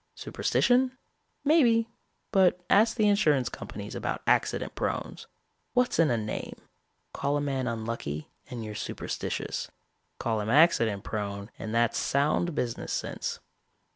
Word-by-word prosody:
Superstition? 255 +1 +1 0.5
Maybe; 240 -7 +4 0.4
but 185 -3 +4
ask 220 +4 +5
the 215 -2 +4
insurance 155 -11 +3
companies - - -7
about - - -3
accident - - +1
prones. - - -3 0.5
What's 250 -5 +2
in 165 - +5
a 120 - +2
name? 105 -1 -4 0.6
Call 145 +1 0
a - - 0
man 135 -3 -1
unlucky 110 -10 -4 0.2
and 120 -3 -5
you're 105 - -6
superstitious. - - -4 0.5
Call 110 -2 -1
him 105 - -3
accident 115 - +4
prone 100 -1 -4
and 110 - -5
that's 115 0 +2
sound 150 +4 +1
business 120 -4 -2
sense. - - -3
140 Hz, 130 wpm, -28 LUFS, -, 0.6 s, ask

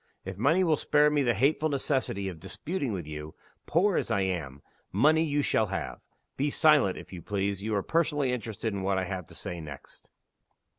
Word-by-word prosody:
If 95 0 -5
money 160 - +3
will 160 -4 +3
spare 150 +1 +3
me 150 -1 +2
the 120 -3 +2
hateful 155 +3 +2
necessity 130 -8 -1
of 90 -4 -6
disputing 140 - -4
with 90 -6 -4
you 75 0 -7 0.3
poor 185 +4 +3
as - - -1
I 110 -4 +1
am, 80 -8 -3 0.3
money 155 - +4
you 145 -2 0
shall 110 - +2
have. 95 - -4 0.4
Be 145 +2 +1
silent, 145 - +4
if - - -10
you 90 - -7
please. 100 +1 -2
You 110 +1 -1
are 100 - 0
personally 150 -5 +1
interested 110 -2 -3
in 100 - -3
what 95 0 0
I 95 - 0
have 90 -3 -5
to - - -14
say 85 -1 -5
next." 75 -3 -11
110 Hz, 200 wpm, -28 LUFS, 95-150 Hz, 0.4 s, money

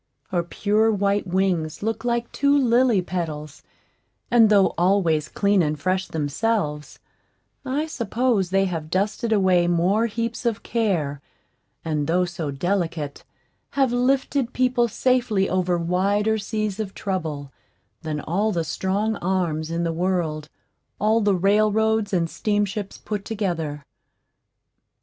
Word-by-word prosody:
Her 180 -3 +1
pure 210 +5 +1
white 200 -1 0
wings 180 -3 0
look 225 +1 -2
like 235 -1 -1
two 285 0 +3
lily 240 -6 +3
petals, 155 -5 -5 0.7
and 230 -2 +6
though 200 -2 +4
always 170 -4 +2
clean 200 +3 +2
and 150 -2 -1
fresh 185 +3 0
themselves, 150 0 -2 0.7
I 280 +3 -1
suppose 235 - 0
they 195 +1 +2
have 165 -4 -4
dusted 210 +6 -1
away 185 -4 +3
more 180 +6 +2
heaps 230 +2 -3
of 230 -3 -1
care, 170 - -1 0.6
and 150 -3 -1
though 180 +2 +2
so 170 -3 -4
delicate, 165 -1 -2 0.5
have 270 -3 +2
lifted 260 0 +1
people 250 -1 +2
safely 235 -4 +1
over 180 -1 +1
wider 200 +6 +1
seas 215 -1 -3
of 200 -3 -4
trouble, 155 -8 -4 0.5
than 155 -3 -3
all 200 +8 0
the 170 -4 -1
strong 200 +7 -1
arms 170 -4 -1
in 170 +1 -1
the 165 -1 -1
world 165 -4 -1 0.5
all 220 +3 +3
the 205 -2 +3
railroads 215 +2 +2
and 175 -3 +1
steamships 205 +1 -2
put 210 -2 -5
together. 165 -10 -3
195 Hz, 130 wpm, -23 LUFS, 170-220 Hz, 0.7 s, and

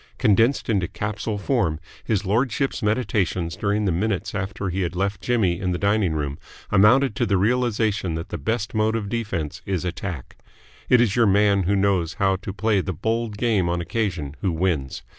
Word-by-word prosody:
Condensed 115 +6 +3
into 100 -7 +1
capsule 105 +2 -3
form, 100 - 0 0.2
his 105 -2 -1
lordship's 125 +6 0
meditations 105 -6 0
during 105 +2 0
the 95 - +2
minutes 95 +3 -1
after 100 0 -3
he 95 +2 -2
had 90 0 -2
left 100 0 -1
Jimmy 100 -8 +1
in 90 -2 -1
the - - -1
dining 100 -3 +1
room 70 -2 -3 0.3
amounted 105 +5 +5
to - - +1
the 100 -1 +2
realisation 110 -4 +1
that 80 +2 -5
the 85 - -5
best 110 +7 -2
mode 110 0 +1
of 105 -3 -3
defence 95 -9 -3
is 95 -3 -2
attack. 90 -5 -5 0.5
It 125 -2 +6
is 110 -4 +2
your 120 -2 +4
man 100 -1 +3
who 100 - +3
knows 95 -4 +1
how 95 -1 +2
to 95 +1 -6
play 105 0 +1
the 95 - -3
bold 110 +4 -2
game 105 -7 +1
on 85 0 0
occasion 85 -7 -2
who 95 - +1
wins. 80 -5 -1
100 Hz, 185 wpm, -23 LUFS, 90-110 Hz, 0.5 s, It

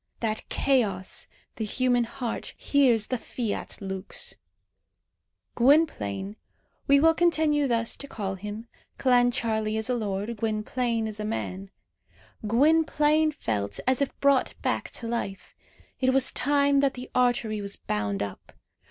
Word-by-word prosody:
That 220 -2 -3
chaos, 210 -9 0 0.3
the 225 - -2
human 245 +2 +1
heart, 245 -1 -5
hears 250 -7 +3
the 255 +1 -2
fiat 225 -1 -4
lux! 190 0 -5 1.2
Gwynplaine 220 - +2 0.5
we 280 0 +6
will 325 +2 +5
continue 315 -4 +2
thus 230 -2 +1
to 280 - -6
call 200 -7 -4
him 210 +4 -7 0.3
(Clancharlie 230 -4 +2
is 220 +3 -1
a - - +2
lord, 210 0 -3
Gwynplaine 225 +2 -1
is 215 -1 -5
a - - -3
man) 195 -3 -4 0.8
Gwynplaine 305 +4 +3
felt 100 - -3
as 260 +1 +2
if 280 - -2
brought 280 -2 +2
back - - -1
to 235 - -6
life. 230 -5 -4 0.5
It 260 0 +2
was 270 -1 +4
time 280 0 +2
that 275 -1 +2
the 250 0 -8
artery 240 -4 +1
was 200 0 -5
bound 105 -1 -2
up. 100 -1 -8
235 Hz, 135 wpm, -26 LUFS, 210-275 Hz, 1.2 s, we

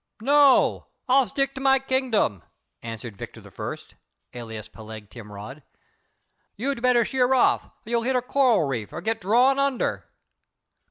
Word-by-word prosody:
"No; 280 +3 +4 0.2
I'll 260 -1 +4
stick 275 +6 -1
to 265 - -7
my 270 0 +4
kingdom," 260 - 0 0.4
answered 115 -1 -7
Victor - - -9
I., - - -6 0.6
alias 115 -3 -8
Peleg 110 -2 -11
Timrod. 105 +5 -10 0.9
"You'd 265 +2 -3
better 245 -2 +3
sheer 260 +1 +2
off; 255 - +2 0.2
you'll 235 +1 0
hit 255 +3 0
a 250 - +1
coral 250 - +3
reef 125 -7 -3
or - - -6
get 225 0 -2
drawn 245 +8 +3
under." 275 -3 -1
235 Hz, 140 wpm, -24 LUFS, -, 0.9 s, No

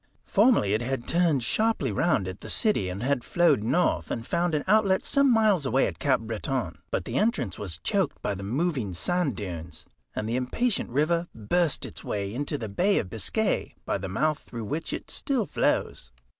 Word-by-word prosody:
Formerly 205 - +4
it 110 - +1
had 125 0 -3
turned 165 -7 +2
sharply 215 - +1
round 105 - +1
at 95 +1 -7
the - - -7
city, 205 - +2
and 95 +5 -5
had 135 -2 +1
flowed 170 -9 +3
north 170 +11 +1
and 115 - -3
found 170 +2 0
an 150 - 0
outlet 200 -2 +3
some 280 -1 +3
miles 215 -8 +4
away 135 0 +2
at - - -4
Cap 130 -5 +2
Breton, 110 - -3
but - - -2
the - - -3
entrance 170 - 0
was 95 -6 -3
choked - - 0
by 105 - -2
the 100 - -6
moving 125 - -1
sand 145 - 0
dunes, 85 -5 -6 0.3
and 105 - -2
the 115 +2 0
impatient 205 - 0
river 160 +7 +1
burst 150 +9 +1
its - - -9
way 100 0 -3
into 145 +3 -2
the 115 - -5
Bay 185 - +2
of 90 - -2
Biscay 195 - -1
by - - -1
the 95 0 -5
mouth 155 +9 0
through 115 -2 -7
which 155 +9 -3
it - - -5
still 260 -6 -1
flows. 60 - 0
135 Hz, 195 wpm, -27 LUFS, -, 0.3 s, Formerly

